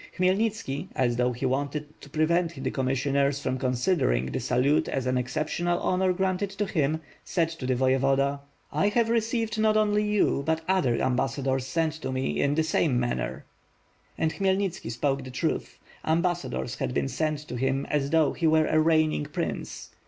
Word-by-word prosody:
Khmyelnitski, 185 -4 0
as 120 -2 +1
though 125 0 +2
he 125 +2 -4
wanted 145 +3 -2
to 145 - -12
prevent 160 0 0
the - - -1
commissioners 140 +2 +1
from 130 -2 -2
con 130 -1 0
sidering 120 - +1
the - - -1
salute 130 +4 +2
as 135 -2 -2
an 130 0 +1
exceptional 155 +7 -1
honor 185 0 +1
granted 190 +1 0
to 200 +1 -2
him, 155 -4 0 0.2
said 165 -2 0
L 165 - -7
t 130 - -4
the 130 - +2
Voyevoda: 135 +2 +2 0.3
"I 200 - +2
have 225 +2 +2
received 230 -1 0
not 215 0 +3
only 210 0 +2
you, 210 -8 +2
but 160 +2 0
other 180 -11 +2
ambassadors 130 0 0
sent 160 +2 0
to 130 - -3
me, 130 0 -1
in 140 +1 +2
the 160 - +2
same 150 -5 +1
manner." 65 - -2 0.7
And 160 0 0
Khmyelnitski 190 - -1
spoke 135 +3 -1
the 130 - -8
truth. 130 -1 -2 0.3
Ambassadors 165 - -1
had 65 - -2
been 70 -1 +1
sent 155 - -1
to - - -5
him 135 +2 0
as 140 -2 -1
though 160 -1 +3
he 165 - 0
were 155 0 +4
a 155 - +1
reignini: 155 - +2
prince. - - -4
145 Hz, 180 wpm, -27 LUFS, 130-180 Hz, 0.7 s, were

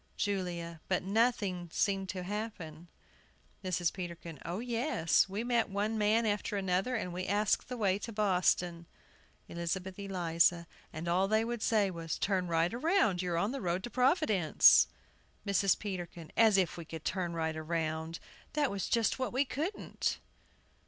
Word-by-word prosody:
JULIA. 175 -5 -3
But 185 - 0
nothing 200 -4 0
seemed 195 0 0
to 185 -1 -4
happen. 180 -5 -6 0.8
MRS. 175 -2 0
PETERKIN. 170 -4 -7
O 170 +3 -4
yes; 230 - +1
we 200 +4 -3
met 240 -2 +1
one 205 +3 -1
man 220 +2 +2
after 205 -1 -1
another, 190 +5 0
and 180 -6 -3
we 185 +1 -4
asked 205 +4 +1
the 250 - -4
way 200 -3 +1
to 230 - -6
Boston. 180 -4 +1 0.6
ELIZABETH 180 +3 -4
ELIZA. 170 -3 +1 0.3
And 160 +2 -6
all 180 +3 +2
they 220 +2 +2
would 240 -1 -3
say 210 -4 +2
was, 165 -2 -4
"Turn 190 -3 0
right 165 +2 +1
round 320 - +2
you 180 -1 -2
are - - 0
on 200 +6 +1
the 275 - -4
road 180 0 -1
to 240 - -6
Providence." 250 - +5 0.6
MRS. 200 -1 +3
PETERKIN. 175 -5 -6
As 220 -3 +5
if 180 -4 +1
we 170 - -7
could 160 0 -8
turn 175 -2 -1
right 160 -1 -1
round! 160 0 -2 0.4
That 295 -2 +1
was 200 -1 -3
just 230 +2 +1
what 255 - -1
we 265 +3 +1
couldn't. 330 +10 -2
190 Hz, 160 wpm, -32 LUFS, 170-220 Hz, 0.8 s, Providence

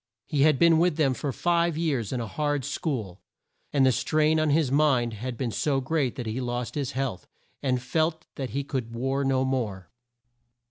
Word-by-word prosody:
He 145 -3 0
had 150 -1 +5
been 165 0 +5
with 170 -2 +2
them 140 -5 +3
for 140 +2 -3
five 170 +2 +1
years 140 -11 -1
in 130 - -1
a 115 - -2
hard 145 +4 -1
school, 110 - -3 0.5
and 140 -2 +3
the 130 - +5
strain 155 +5 +2
on 155 -1 +2
his 145 -2 +2
mind 135 -5 +3
had 120 +3 -5
been 120 -2 -2
so 140 +4 0
great 135 -1 -1
that 125 - -5
he 110 +4 -3
lost 120 -1 -3
his 140 -2 -3
health, 130 -8 -3 0.3
and 130 -3 +1
felt 160 +5 -1
that 135 -2 -4
he 140 +1 -2
could 125 -5 -4
war 135 +3 -1
no 135 -1 +2
more. 105 -10 -2
135 Hz, 195 wpm, -26 LUFS, 125-155 Hz, 0.5 s, had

